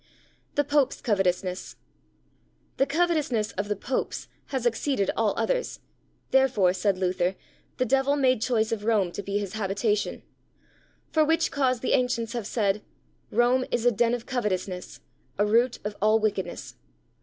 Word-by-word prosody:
The 290 - +3
Popes' 285 -2 +1
Covetousness. 185 -4 -1 1.0
The 270 - +3
covetousness 295 -8 +1
of 200 +1 -3
the 210 - -1
Popes 255 +6 -3 0.2
has 260 -3 -3
exceeded 235 -2 +1
all 220 -3 +1
others', - - -1 0.5
therefore, 255 -9 +4
said 190 +1 +1
Luther, 185 0 0 0.4
the 255 - +1
devil 270 +3 +2
made 255 -5 +2
choice 225 -2 +1
of 220 -2 -2
Rome 210 -5 +2
to 205 - -5
be 200 0 -2
his 200 -1 -4
habitation; 210 0 -1 0.9
for 315 - +4
which 325 +1 +2
cause 255 -4 +1
the - - 0
ancients 235 -2 +1
have 235 -4 -3
said, 210 -3 0 0.5
"Rome 245 +3 +3
is 235 - -1
a 245 - +6
den 235 +2 +2
of 235 - -7
covetousness, 195 -7 -3 0.4
a 205 - +3
root 235 +4 +3
of 210 0 -4
all 215 +1 +5
wickedness." 200 -5 -3
225 Hz, 150 wpm, -26 LUFS, 200-260 Hz, 1.0 s, a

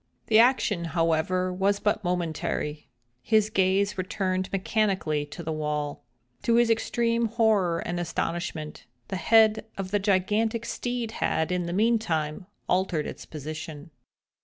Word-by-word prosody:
The 220 -1 +5
action, 225 -7 +3
however, 165 +3 +1
was 200 +2 +1
but 210 - 0
momentary, 160 -4 -2 0.3
his 215 - +2
gaze 195 +1 +2
returned 185 0 -1
mechanically 190 -7 0
to 170 +4 -8
the 160 - -3
wall. 150 -1 -2 0.4
To 230 - +2
his 235 -1 +4
extreme 230 +1 +1
horror 215 -7 +2
and 175 0 -2
astonishment, 165 -2 -4 0.2
the 190 - -2
head 220 +1 +4
of 195 -1 -4
the 205 - +2
gigantic 210 +4 +1
steed 245 -2 -3
had, 160 -6 -1
in 180 -1 -1
the - - -3
meantime, 185 -6 0 0.2
altered 180 -4 +1
its - - -8
position. 155 +1 -7
185 Hz, 135 wpm, -27 LUFS, 165-215 Hz, 0.4 s, The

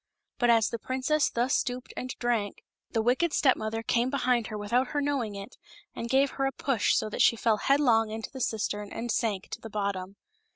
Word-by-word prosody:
But 240 - +3
as 225 -3 +4
the 230 - -4
princess 265 +5 0
thus 245 +4 0
stooped 250 0 -2
and 255 - -5
drank, 230 -4 -1 0.3
the 225 - 0
wicked 260 +8 +2
stepK 265 -3 +4
mother 220 +1 -4
came 240 +2 +1
behind 250 -4 +1
her 215 - -5
without 235 +5 +1
her 290 - -2
knowing 275 -7 -1
it, 200 +1 -9 0.4
and 235 - -5
gave 270 +2 +3
her 270 0 -1
a - - -1
push 265 -5 +1
so - - +1
that - - -2
she - - +5
fell 225 -1 +2
headlong 240 -5 +3
into 220 0 -6
the 265 - -7
cistern 210 -3 -2
and 235 0 -3
sank 210 -4 -1
to - - -7
the 225 - -8
bottom. 200 -2 -3
235 Hz, 210 wpm, -28 LUFS, 215-260 Hz, 0.4 s, she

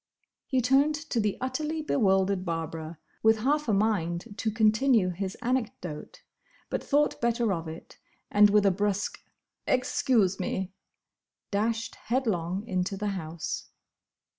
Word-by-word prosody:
He 260 -2 +1
turned 275 +5 +3
to 295 -5 -3
the 210 -2 0
utterly 305 +5 -2
bewildered 195 -8 +2
Barbara, 165 -1 -4 0.2
with 220 0 +4
half 295 +4 +1
a 220 - +2
mind 195 -1 0
to 220 - 0
continue 220 -1 +3
his 190 +2 -4
anecdote, 225 -11 -3 0.5
but - - -2
thought 295 +1 +1
better 235 -3 +1
of 165 -2 -4
it, 160 +1 -10 0.3
and 205 0 +7
with 205 0 +4
a 195 - +5
brusque, 205 +1 -1 0.5
"Excuse 245 -6 +2
me!" 190 0 -3 0.8
dashed 225 +3 -1
headlong 210 -6 -1
into 185 -1 -1
the 210 +1 -2
house. 170 -4 -5
210 Hz, 130 wpm, -28 LUFS, 185-245 Hz, 0.8 s, and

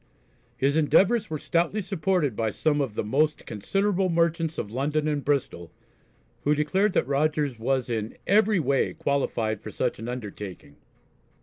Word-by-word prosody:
His 140 +3 +1
endeavours 195 +7 +3
were 155 - -2
stoutly 170 +7 0
supported 180 - 0
by 110 0 0
some 145 +7 0
of 125 -7 -3
the - - -1
"most 150 +8 0
considerable 190 - 0
merchants 165 -1 +1
of 105 - -4
London 150 +5 -1
and 145 -2 -1
Bristol," 125 - -1 0.7
who 150 +1 +3
declared 185 +7 +1
that - - +2
Rogers 145 -2 0
was 130 +2 0
in 110 -2 -3
"every 210 0 +4
way 140 -3 +1
qualified 115 -6 -1
for - - -7
such - - -2
an 115 +2 -5
undertaking." 105 - -7
145 Hz, 150 wpm, -26 LUFS, 120-170 Hz, 0.7 s, every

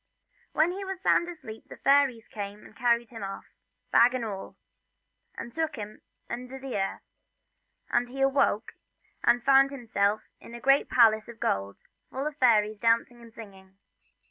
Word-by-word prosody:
When 320 +3 +3
he 390 +2 -5
was 385 -1 -5
sound 350 -2 +2
asleep 265 -11 -10
the - - -10
fairies 275 -5 +3
came 205 0 -7
and - - -16
carried 235 0 +1
him 225 -2 -9
off, 195 0 -6 0.5
bag 245 +2 +5
and 245 -2 -2
all, 195 -3 -7 0.8
and 235 - -8
took 320 -1 -2
him 210 -2 -8 0.3
under 250 +2 -6
the 265 -1 -6
earth, 195 -1 -2 0.9
and 240 +1 +2
when 250 - -12
he - - -2
awoke 270 -6 +1 0.5
he 235 0 +5
found 270 +2 +5
himself 220 -6 -1 0.2
in 235 - -11
a - - -7
great 275 +3 +3
palace 220 -3 +4
of 235 -1 -11
gold, 100 +1 -2 0.3
full 270 +2 -4
of 300 -1 -3
fairies 215 -5 +3
dancing 235 +1 +1
and 230 -1 -14
singing. 195 -4 -13
235 Hz, 170 wpm, -28 LUFS, 215-270 Hz, 0.9 s, bag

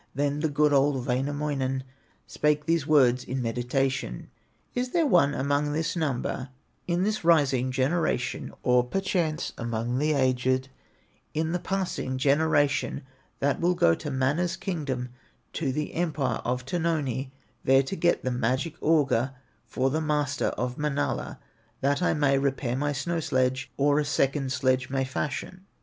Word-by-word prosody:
Then 145 +1 0
the 160 +1 0
good, 150 0 +3
old 135 -2 +2
Wainamoinen 135 0 -1 0.4
Spake 150 0 0
these 165 -2 +1
words 130 -5 +4
in 130 +1 -3
meditation: 125 - -2 0.4
"Is 250 0 -2
there 335 -2 +3
one 165 - +4
among 145 +2 0
this 160 +2 -1
number, 135 -4 -2 0.4
In 175 +1 +1
this 215 0 -1
rising 140 -6 +3
generation, 130 -1 0
Or 125 0 +4
perchance 175 +1 -1
among 115 +2 -2
the 155 +1 +2
aged, 130 -1 +1 0.7
In 160 +1 0
the 180 - 0
passing 185 -9 -2
generation, 145 0 +2 0.4
That 140 0 +1
will 180 +1 +2
go 85 - +4
to 145 - -4
Mana's 140 +6 0
kingdom, 140 -9 -3 0.4
To 145 -5 -1
the 150 +3 -3
empire 150 -8 -1
of 125 +1 -2
Tuoni, 145 -5 -1 0.3
There 135 +1 +5
to 135 - -4
get 175 -2 +1
the 130 - -1
magic 130 +6 -1
auger 135 -5 +2 0.3
From 130 +3 0
the 160 - 0
master 150 -2 0
of 125 +2 -3
Manala, 150 -1 -1 0.4
That 140 +3 +1
I 180 - +2
may 140 -2 +3
repair 135 -3 -1
my 145 +2 0
snow 165 +5 -2
sledge, 130 -3 0
Or 145 +1 +3
a 150 - 0
second 135 -1 0
sledge 130 -1 +1
may 135 -1 0
fashion?" 150 +7 -4
140 Hz, 150 wpm, -27 LUFS, 130-155 Hz, 0.7 s, There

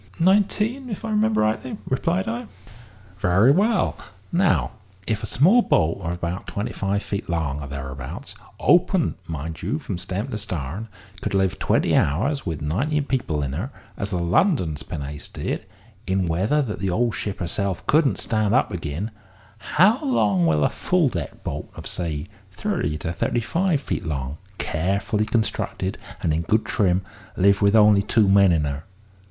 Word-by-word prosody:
"Nineteen, 210 +8 +2
if 210 +1 -5
I 220 - -3
remember 215 +1 +2
rightly," 110 +4 -1
replied 170 +8 0
I. 235 +1 -3 0.7
"Very 95 +8 +5
well; 205 +5 +2 0.3
now 155 - +2 0.3
if 110 -1 -1
a - - -4
small 190 - +5
boat 80 - +2
of 85 -1 -2
about 85 +1 -4
twenty 100 +2 -3
five 100 +1 -1
feet 100 -3 -4
long 75 -4 -1
or 70 - -6
thereabouts, 65 -2 -6 0.3
open, - - +3
mind 80 0 -5
you, 105 - -1
from 100 - -5
stem 95 +7 -3
to 110 - -3
starn, 90 +1 -4 0.3
could - - -2
live 95 -2 +1
twenty - - +2
hours 130 - +1
with 80 -3 -3
nineteen 140 - 0
people 85 - -1
in 70 -1 -3
her, 90 - -3 0.3
as 100 - -3
the 95 - -1
London's 85 - +2
pinnace 70 +1 -6
did, - - -4 0.4
in 95 -1 +1
weather 100 - +2
that 105 -5 -4
the 95 -1 -1
old 115 +5 +1
ship 100 -2 -3
herself 95 +1 -2
couldn't 150 -2 +3
stand 110 -2 +1
up 130 - +2
agin, 80 +5 -4 0.7
how 215 - +5
long 100 - +2
will 75 -2 +3
a - - +4
full 175 -6 +2
decked - - -6
boat - - -4
of, - - -9
say, 75 -4 -2 0.3
thirty 130 - -2
to 80 +2 -4
thirty 120 - 0
five 170 +6 +1
feet 135 - -3
long, 70 -3 -3 0.2
carefully 100 +6 0
constructed, 110 -4 -1 0.2
and 80 - +2
in 80 - +1
good 105 +6 +1
trim, 95 -4 +1 0.3
live 100 +2 +4
with 100 +1 +4
only 105 -2 +6
two 105 +1 +3
men 100 -1 +6
in 80 -3 +2
her? 70 +1 -3
100 Hz, 170 wpm, -23 LUFS, 80-135 Hz, 0.7 s, only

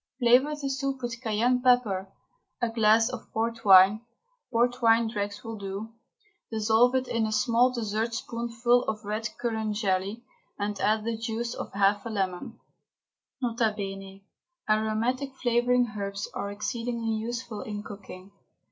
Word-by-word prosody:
Flavour 255 +4 +4
the 290 -2 -4
soup 270 -1 -2
with 235 0 -4
cayenne 240 +2 +1
pepper, 215 -7 +2 0.5
a 240 -2 0
glass 225 0 +4
of 255 -3 -7
port 230 +1 -2
wine 195 +2 +7 0.5
(port 245 +1 +1
wine 230 0 +4
dregs 205 -1 -4
will 225 -2 -6
do), 200 +3 -6 0.6
dissolve 225 +3 +3
in 260 0 +1
it 230 -3 0
a - - -3
small 235 +3 +3
dessertspoonful 235 +1 0
of 215 -1 -4
red 215 +2 -2
currant 220 -3 -2
jelly, 200 +2 -1 0.3
and 205 -1 -3
add 215 +2 +2
the 230 +1 -2
juice 230 +1 -3
of - - -6
half 200 +1 +2
a - - -4
lemon. 190 -4 -3 0.8
N.B. 195 -4 -2 0.4
Aromatic 225 +5 0
flavouring 245 -2 +2
herbs 200 0 -4
are 200 - -3
exceedingly 230 +2 -3
useful 230 0 -4
in 210 -1 -5
cooking. 200 -2 -10
225 Hz, 140 wpm, -27 LUFS, 210-240 Hz, 0.8 s, wine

